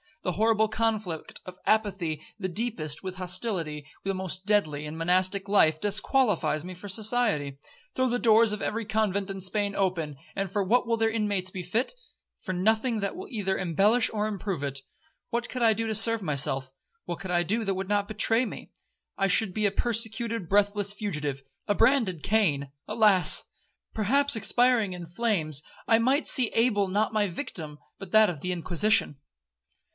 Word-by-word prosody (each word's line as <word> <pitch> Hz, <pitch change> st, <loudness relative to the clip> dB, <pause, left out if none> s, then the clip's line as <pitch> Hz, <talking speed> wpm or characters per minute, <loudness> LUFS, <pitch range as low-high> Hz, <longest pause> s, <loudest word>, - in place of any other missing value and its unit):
The 180 Hz, -, -1 dB
horrible 220 Hz, +2 st, +2 dB
conflict 215 Hz, -7 st, -3 dB
of 185 Hz, 0 st, -10 dB
apathy 190 Hz, -8 st, 0 dB, 0.2 s
the 185 Hz, -, -2 dB
deepest, 180 Hz, -7 st, -2 dB
with 185 Hz, -1 st, -5 dB
hostility 180 Hz, -5 st, -3 dB, 0.2 s
the 195 Hz, -, -1 dB
most 185 Hz, 0 st, -2 dB
deadly, 155 Hz, -8 st, +1 dB
in 150 Hz, +1 st, -7 dB
monastic 185 Hz, +4 st, +1 dB
life, 160 Hz, -6 st, +3 dB
disqualifies 205 Hz, -, +1 dB
me 185 Hz, +1 st, -7 dB
for 180 Hz, +3 st, -10 dB
society. 205 Hz, -, +1 dB, 0.4 s
Throw 260 Hz, 0 st, +2 dB
the 245 Hz, 0 st, 0 dB
doors 225 Hz, -1 st, +5 dB
of 210 Hz, -, -3 dB
every 230 Hz, +1 st, -2 dB
convent 200 Hz, -2 st, -1 dB
in 195 Hz, -1 st, -5 dB
Spain 200 Hz, +1 st, 0 dB
open, 170 Hz, -7 st, -1 dB, 0.2 s
and 195 Hz, -1 st, -2 dB
for 205 Hz, 0 st, 0 dB
what 235 Hz, +7 st, +2 dB
will 230 Hz, 0 st, +1 dB
their 225 Hz, 0 st, +2 dB
inmates 205 Hz, -4 st, 0 dB
be 185 Hz, -1 st, -6 dB
fit? 225 Hz, -, -1 dB, 0.5 s
For 185 Hz, -, -5 dB
nothing 220 Hz, +5 st, +1 dB
that 200 Hz, -1 st, -3 dB
will 375 Hz, +3 st, -8 dB
either 200 Hz, -6 st, -2 dB
embellish 195 Hz, +7 st, +2 dB
or 215 Hz, -1 st, -1 dB
improve 195 Hz, -7 st, -4 dB
it. 140 Hz, -1 st, -1 dB, 0.5 s
What 240 Hz, +1 st, -2 dB
could 250 Hz, -1 st, -3 dB
I 225 Hz, -1 st, +5 dB
do 225 Hz, +2 st, -2 dB
to 220 Hz, -, -1 dB
serve 225 Hz, +1 st, +5 dB
myself?—what 140 Hz, -, -3 dB
could 190 Hz, -1 st, -6 dB
I 175 Hz, -1 st, +3 dB
do 220 Hz, +7 st, 0 dB
that 195 Hz, -2 st, -1 dB
would 190 Hz, +1 st, -5 dB
not 205 Hz, -1 st, +1 dB
betray 225 Hz, +3 st, +3 dB
me? -, -, -9 dB, 0.5 s
I 195 Hz, -, +2 dB
should 195 Hz, 0 st, +3 dB
be 210 Hz, +1 st, +1 dB
a -, -, -1 dB
persecuted, 230 Hz, -4 st, -1 dB
breathless 205 Hz, 0 st, +2 dB
fugitive,—a 150 Hz, -4 st, -4 dB
branded 225 Hz, -, +2 dB
Cain. 155 Hz, -11 st, +1 dB, 0.2 s
Alas!—perhaps 215 Hz, +4 st, 0 dB
expiring 235 Hz, -2 st, +2 dB
in 175 Hz, -1 st, -8 dB
flames, 170 Hz, -, -1 dB, 0.3 s
I 225 Hz, -1 st, +4 dB
might 265 Hz, +6 st, +1 dB
see 250 Hz, -4 st, +4 dB
Abel 225 Hz, -4 st, +2 dB
not 210 Hz, +4 st, 0 dB
my 210 Hz, -1 st, +1 dB
victim, 165 Hz, -, -6 dB, 0.2 s
but 195 Hz, -3 st, -9 dB
that 215 Hz, -1 st, +6 dB
of 155 Hz, -5 st, -10 dB
the 180 Hz, -, -2 dB
Inquisition.' 180 Hz, 0 st, +1 dB
200 Hz, 170 wpm, -27 LUFS, 180-225 Hz, 0.5 s, that